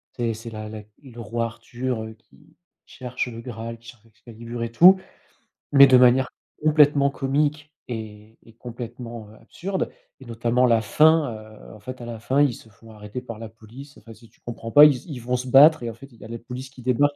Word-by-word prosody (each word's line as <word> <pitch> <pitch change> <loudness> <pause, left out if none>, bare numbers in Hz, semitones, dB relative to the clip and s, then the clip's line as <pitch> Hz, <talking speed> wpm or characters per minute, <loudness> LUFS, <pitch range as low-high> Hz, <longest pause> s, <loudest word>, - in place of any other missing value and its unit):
c'est 115 -2 -1
c'est 115 +2 -9
la 110 -1 -7
la 110 -1 -8 0.2
le 120 -3 -13
roi 115 +2 -3
Arthur, 120 +1 -5
heu, 110 - -9
qui 110 - -25 0.3
cherche 125 0 -5
le 115 -1 -8
graal, 115 -1 -7
qui 115 - -19
cherche 115 -2 -17
Excalibur 115 +2 -9
et 115 - -5
tout. 185 +9 +7 0.7
Mais 140 -1 +8
de 130 - +6
manière 125 +1 +4 0.3
complètement 150 -2 +4
comique 150 +3 -2 0.2
et 110 -2 -9
et 115 - -18
complètement, 115 -2 -9
heu, 110 - -16
absurde. 190 +1 -4 0.3
Et - - -12
notamment, 120 +2 0
la 115 -2 +3
fin, 155 +4 +3
heu, 110 0 -13
en 105 - -14
fait, 130 +4 -9
à - - -7
la 115 -1 -7
fin, 130 +5 +1
ils 140 -4 +3
se 110 - -14
font 110 +2 -18
arrêter 105 +3 -8
par 115 -3 -9
la 115 - -7
police, 115 +6 -14
enfin, 115 +2 -14
si 115 +1 -18
tu - - -32
comprends 115 -1 -8
pas, 145 - +8
ils 145 -3 +4
se 125 - -16
ils 135 -7 -7
vont 125 +1 -1
se 130 - -6
battre 145 +4 +6
et 115 - -3
en - - -7
fait, 135 +4 -15
il 115 - -20
y - - -12
a - - -9
la 115 +1 -6
police 125 +2 -9
qui 135 -1 -15
débarque 145 +4 +1
120 Hz, 225 wpm, -23 LUFS, 115-135 Hz, 0.7 s, Mais